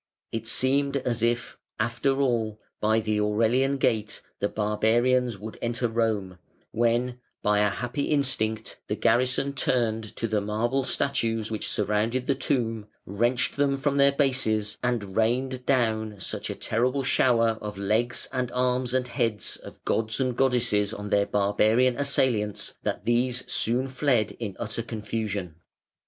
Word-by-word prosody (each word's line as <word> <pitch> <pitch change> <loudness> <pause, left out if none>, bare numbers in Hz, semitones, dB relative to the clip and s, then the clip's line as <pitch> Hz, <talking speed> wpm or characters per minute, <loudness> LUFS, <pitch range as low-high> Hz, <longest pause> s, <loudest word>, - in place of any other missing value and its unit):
It 115 0 -4
seemed 140 +3 +2
as 120 -4 -2
if, 120 +1 -1 0.2
after 120 +5 0
all, 115 -5 0 0.2
by 110 +1 +2
the 110 -1 0
Aurelian 115 +6 +2
Gate 110 -5 0 0.2
the 100 - 0
barbarians 115 +3 +1
would 110 +3 -9
enter 120 +1 -1
Rome, 110 -5 -1 0.3
when, 120 +2 +1 0.2
by 105 0 +3
a 105 0 +3
happy 125 +6 -3
instinct, 110 -7 -1
the 105 - -1
garrison 125 +5 +1
turned 115 -5 0
to 115 - -2
the 105 -1 0
marble 115 +6 0
statues 115 -5 0
which 110 - -2
surrounded 105 +5 0
the 140 - +2
tomb, 115 -5 -1 0.2
wrenched 120 +8 0
them 140 -1 +2
from 140 0 0
their 140 0 +6
bases, 125 -7 +1
and 115 -6 -2
rained 125 +3 0
down 110 -5 +1
such - - -3
a - - -3
terrible 125 +4 0
shower 115 -3 +3
of 105 -1 -6
legs 110 +5 +1
and 125 -2 -1
arms 125 0 +1
and 130 -1 +1
heads 115 -3 -1
of - - -14
gods 110 +2 0
and 130 -2 0
goddesses 120 -5 +2
on 105 0 -7
their 100 0 +3
barbarian 110 +5 +2
assailants 125 -7 0
that - - -3
these 120 +1 +1
soon 120 +3 +1
fled 130 -4 +1
in 105 -5 -5
utter 110 +2 -3
confusion. 105 -5 -4
115 Hz, 145 wpm, -26 LUFS, 110-130 Hz, 0.3 s, their